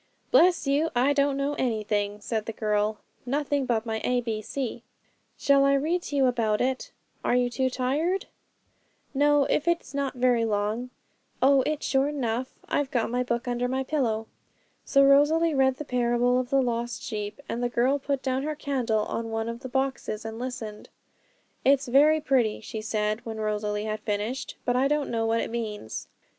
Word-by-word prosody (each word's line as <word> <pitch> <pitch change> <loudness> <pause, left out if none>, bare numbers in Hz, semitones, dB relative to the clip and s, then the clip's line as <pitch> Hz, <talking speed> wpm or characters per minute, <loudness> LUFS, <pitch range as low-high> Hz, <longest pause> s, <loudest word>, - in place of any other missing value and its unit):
'Bless 360 -9 +5
you! 285 +4 +2
I 260 +4 +3
don't 280 -1 +2
know 280 +1 0
anything,' 210 -4 -1
said 220 0 -3
the 225 - -3
girl; 210 0 0 0.3
'nothing 280 +1 -1
but 225 -2 0
my 220 -1 -2
A 250 0 +2
B 225 -2 -3
C.' 240 +1 -4 0.6
'Shall 280 -1 +4
I 275 0 +4
read 320 +6 0
to 290 - -6
you 275 -1 +4
about 230 -4 +1
it; 260 +1 -1 0.3
are - - +2
you 245 0 +2
too 260 +2 0
tired?' 290 +10 0 0.9
'No, 290 +1 +4
not - - 0
if 300 - +1
it's 340 -5 0
not 275 -1 -2
very 245 -2 +3
long.' 215 +3 -1 0.5
'Oh, 270 +1 +5
it's 305 -1 -2
short 275 +2 +1
enough; 250 -1 -2 0.2
I've 290 -2 0
got 235 -3 0
my 250 +1 0
book 240 0 -2
under 245 0 0
my 260 +1 -1
pillow.' 240 -6 -1 0.6
So 275 -1 +4
Rosalie 300 +4 +5
read 265 -1 +3
the 300 - -7
parable 245 0 +2
of 250 -1 -3
the 270 0 +3
Lost 240 0 -2
Sheep; 210 +1 -5
and 235 - -3
the 245 - 0
girl 255 +4 +2
put 275 -1 -2
down 260 0 0
her 305 +2 -3
candle 250 -8 0
on 225 0 -3
one 225 0 -2
of 230 0 -4
the 260 - -7
boxes 265 -5 -2
and 225 0 -6
listened. 225 -4 -6 0.7
'It's 275 0 +3
very 295 +5 +5
pretty,' 255 -8 +1
she 220 0 -6
said, 215 0 -1
when 220 -1 -6
Rosalie 210 0 -1
had 215 0 -2
finished, 215 +5 -3
'but 245 - +1
I 260 +2 +3
don't 295 0 0
know 225 -1 0
what 230 0 +1
it - - -4
means.' 215 - -5
250 Hz, 190 wpm, -26 LUFS, 225-275 Hz, 0.9 s, Bless